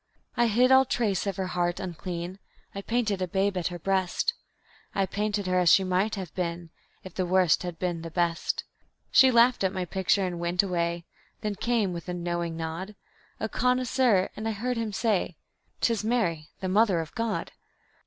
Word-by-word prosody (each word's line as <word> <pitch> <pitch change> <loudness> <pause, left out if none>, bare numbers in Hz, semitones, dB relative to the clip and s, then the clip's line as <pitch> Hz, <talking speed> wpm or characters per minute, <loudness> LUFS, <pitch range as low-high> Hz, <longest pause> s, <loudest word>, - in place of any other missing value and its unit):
I 240 - +3
hid 245 +4 +3
all 265 0 +8
trace 210 -7 0
of 195 - -1
her 190 - -1
heart 175 -1 0
unclean; 180 +1 -5 0.3
I 200 - -5
painted 220 -3 -1
a 185 - 0
babe 195 +2 0
at 180 -2 0
her 175 - -5
breast; 190 +1 0 0.6
I 195 - +2
painted 205 +1 -2
her 185 0 +2
as 180 -2 +4
she 195 - +6
might 190 +4 +1
have 190 -4 -6
been 170 -2 -4 0.3
If 185 - -10
the 185 - -1
Worst 180 -2 +3
had 175 -2 -5
been 175 -2 -2
the 165 - -6
Best. 170 0 -1 0.5
She 265 - +7
laughed 240 -1 +4
at 190 - +2
my 185 -2 -3
picture 190 +2 +1
and 175 -2 -4
went 175 +2 +1
away. 170 -2 -1 0.4
Then 210 -1 -1
came, 215 -2 0
with 170 +1 -7
a 180 - -2
knowing 170 -1 -3
nod, 165 +5 -5 0.4
A 220 - -1
connoisseur, 250 -4 +2
and 215 +1 -4
I 225 - 0
heard 245 +5 -2
him 225 -2 -2
say; 195 -4 0 0.4
"'Tis 230 -3 +1
Mary, 175 -10 0
the 190 - -2
Mother 195 -2 +3
of 160 -2 -5
God." 230 -1 -2
190 Hz, 190 wpm, -27 LUFS, 175-215 Hz, 0.6 s, all